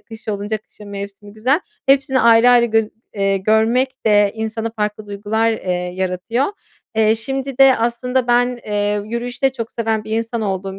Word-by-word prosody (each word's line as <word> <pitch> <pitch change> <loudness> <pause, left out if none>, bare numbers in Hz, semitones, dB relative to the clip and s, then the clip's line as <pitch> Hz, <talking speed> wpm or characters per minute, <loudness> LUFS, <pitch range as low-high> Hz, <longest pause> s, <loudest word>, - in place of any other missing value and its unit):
kış 225 -1 -13
olunca 205 +1 -2
kışın 210 -1 -15
mevsimi 200 0 -8
güzel. 255 +10 +1 0.3
Hepsini 270 -1 +3
ayrı 230 +1 +6
ayrı 240 -1 +5
gör 225 -1 +1 0.3
eee, 195 -1 +1
görmek 225 +6 +1
de 205 -1 +4
insana 220 0 -3
farklı 210 0 -3
duygular, 210 +3 0
eee, 185 -4 -3 0.2
yaratıyor. 190 +8 -1 0.5
Eee, 220 0 +4
şimdi 270 +3 -3
de 270 -1 +7
aslında 240 +2 -1
ben, 245 0 +2
eee, 205 0 0
yürüyüşü 235 +3 -5
de 270 - +4
çok 230 -3 -6
seven 225 -2 -1
bir 215 - -9
insan 230 0 -3
olduğum 195 -1 -3
225 Hz, 165 wpm, -19 LUFS, 205-245 Hz, 0.5 s, de